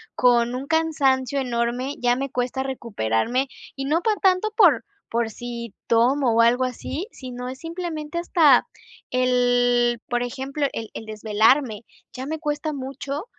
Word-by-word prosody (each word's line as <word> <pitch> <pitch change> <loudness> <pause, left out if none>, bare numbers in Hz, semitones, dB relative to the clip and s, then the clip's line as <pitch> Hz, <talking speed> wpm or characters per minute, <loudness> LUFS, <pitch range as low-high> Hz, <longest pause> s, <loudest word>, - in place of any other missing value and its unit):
con 240 -1 +3
un 260 +2 -4
cansancio 280 -5 +1
enorme, 245 +1 -1
ya 245 0 +2
me 270 +1 -3
cuesta 250 +1 -1
recuperarme", 235 - -1 0.3
y 270 - -4
no 310 +5 +1
por 435 +3 +2
tanto 380 +3 +2
por 310 - +6 0.3
por 230 0 0
si 235 -2 -7
tomo 245 +2 +3
o 230 - +5
algo 240 +2 +4
así, 280 - -5
sino 250 -1 -7
es 260 +1 -8
simplemente 330 -2 -5
hasta 315 -6 +5 0.5
el 245 -1 +2
por 240 0 0
ejemplo, 270 +4 -3
el 225 -1 -5
el 225 - -6
desvelarme, 220 +2 +2 0.3
ya 260 +1 -6
me 315 +1 -3
cuesta 300 0 -2
mucho 275 +4 -5
255 Hz, 150 wpm, -23 LUFS, 240-290 Hz, 0.5 s, por